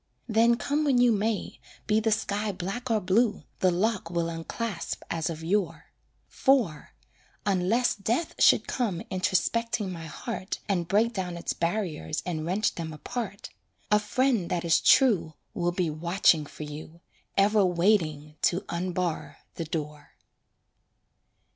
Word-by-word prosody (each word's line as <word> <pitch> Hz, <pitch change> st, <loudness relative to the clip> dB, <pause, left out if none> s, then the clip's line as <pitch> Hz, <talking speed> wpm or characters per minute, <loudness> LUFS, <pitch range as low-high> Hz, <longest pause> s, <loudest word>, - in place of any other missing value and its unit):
Then 230 Hz, +1 st, +4 dB
come 290 Hz, +4 st, 0 dB
when 280 Hz, -4 st, +3 dB
you 245 Hz, -1 st, +5 dB
may, 215 Hz, 0 st, -1 dB, 0.3 s
be 215 Hz, 0 st, +3 dB
the 220 Hz, 0 st, +1 dB
sky 210 Hz, 0 st, 0 dB
black 195 Hz, +7 st, -5 dB
or 225 Hz, -2 st, +3 dB
blue, 205 Hz, +4 st, +1 dB, 0.2 s
The 185 Hz, -, +4 dB
lock 190 Hz, 0 st, 0 dB
will 170 Hz, -1 st, -1 dB
unclasp 170 Hz, +4 st, -4 dB
as 165 Hz, -1 st, -1 dB
of 160 Hz, -1 st, -6 dB
yore; 190 Hz, +2 st, -1 dB, 0.4 s
For 230 Hz, -, +1 dB, 0.5 s
(unless 200 Hz, +5 st, +2 dB
Death 230 Hz, -, -1 dB
should -, -, +5 dB
come 205 Hz, -9 st, -1 dB
introspecting 200 Hz, +3 st, 0 dB
my 165 Hz, -2 st, -7 dB
heart, 200 Hz, +3 st, -5 dB
And 180 Hz, -5 st, 0 dB
break 225 Hz, +5 st, +2 dB
down 180 Hz, -4 st, -3 dB
its 170 Hz, -, -3 dB
barriers 170 Hz, -, -2 dB
and 160 Hz, -3 st, -3 dB
wrench 200 Hz, +5 st, +1 dB
them 165 Hz, -2 st, -5 dB
apart), 200 Hz, +4 st, -6 dB, 0.4 s
A 210 Hz, -, +6 dB
friend 235 Hz, -3 st, +1 dB
that 175 Hz, -1 st, -1 dB
is 165 Hz, -, +4 dB
true 210 Hz, -, +4 dB, 0.2 s
Will 175 Hz, 0 st, 0 dB
be 175 Hz, -2 st, -1 dB
watching 165 Hz, -1 st, +2 dB
for 155 Hz, -, -9 dB
you, 155 Hz, +3 st, -9 dB, 0.4 s
Ever 205 Hz, +1 st, +4 dB
waiting 170 Hz, -5 st, +1 dB
to 180 Hz, +2 st, +1 dB
unbar 175 Hz, -1 st, -2 dB, 0.2 s
the 165 Hz, -, -4 dB
door. 150 Hz, -2 st, -6 dB
185 Hz, 140 wpm, -27 LUFS, 170-220 Hz, 0.5 s, A